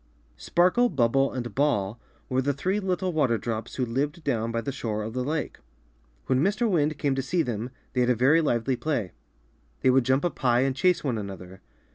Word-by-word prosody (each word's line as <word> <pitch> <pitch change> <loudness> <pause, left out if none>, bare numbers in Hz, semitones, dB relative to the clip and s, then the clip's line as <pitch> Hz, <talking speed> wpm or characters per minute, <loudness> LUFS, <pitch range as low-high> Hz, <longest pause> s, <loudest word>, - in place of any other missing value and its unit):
Sparkle, 180 - +3
Bubble, 135 -2 +2
and 120 -4 -5
Ball 115 -7 0 0.3
were 130 0 +1
the 140 +2 0
three 185 +8 0
little 185 -2 -1
water 135 -7 +2
drops 110 0 -4
who 130 - 0
lived 145 +7 -2
down 115 -5 -1
by 115 - -1
the 140 +4 -3
shore 110 -5 -3
of 110 +1 -5
the 125 0 -2
lake. 150 +3 -3 0.7
When 130 0 +2
Mr. 205 +7 +1
Wind 155 -6 +1
came 140 -3 0
to 135 - -1
see 165 +6 0
them, 120 -1 -3 0.2
they 125 - +1
had 125 - +2
a 125 - +4
very 135 +8 +4
lively 130 -3 0
play. 120 - -2 0.7
They 130 - +4
would 130 0 +4
jump 130 +5 +1
up 175 - -3
high 120 -2 +3
and 135 0 +1
chase 180 +4 +2
one 125 -6 -1
another. 95 -2 -8
130 Hz, 205 wpm, -26 LUFS, 115-155 Hz, 0.7 s, a